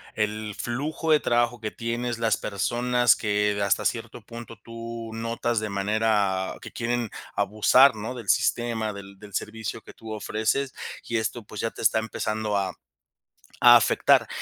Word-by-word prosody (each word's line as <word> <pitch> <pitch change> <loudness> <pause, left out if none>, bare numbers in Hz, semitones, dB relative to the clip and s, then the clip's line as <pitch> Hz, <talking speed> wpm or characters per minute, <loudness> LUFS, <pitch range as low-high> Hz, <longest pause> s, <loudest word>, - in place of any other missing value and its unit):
el 105 -1 -2
flujo 155 +6 -2
de 150 - +6
trabajo 120 -2 +1
que 110 -1 -4
tienes, 120 0 -3
las 115 -1 +1
personas 120 +4 +2
que 105 -1 0
hasta 100 - +1
cierto - - -2
punto 115 -1 -10
tú 115 +1 -8
notas 115 0 -1
de 110 - -3
manera 100 -1 +1
que - - -9
quieren 120 -1 -2 0.3
abusar, 110 +6 +5
¿no? 110 +4 -5
Del 115 -5 -8
sistema, 115 -3 +1
del 100 -1 -11
del 105 -1 -13
servicio 110 +1 -4
que - - -14
tú 110 -1 -8
ofreces, 110 +6 -1 0.3
y 115 - -2
esto 110 +1 -2
pues 105 0 -9
ya 115 - -1
te - - -10
está 110 0 +3
empezando 110 -1 -2
a 95 -2 0 0.9
a - - +9
afectar, - - +4
110 Hz, 160 wpm, -25 LUFS, 105-120 Hz, 0.9 s, a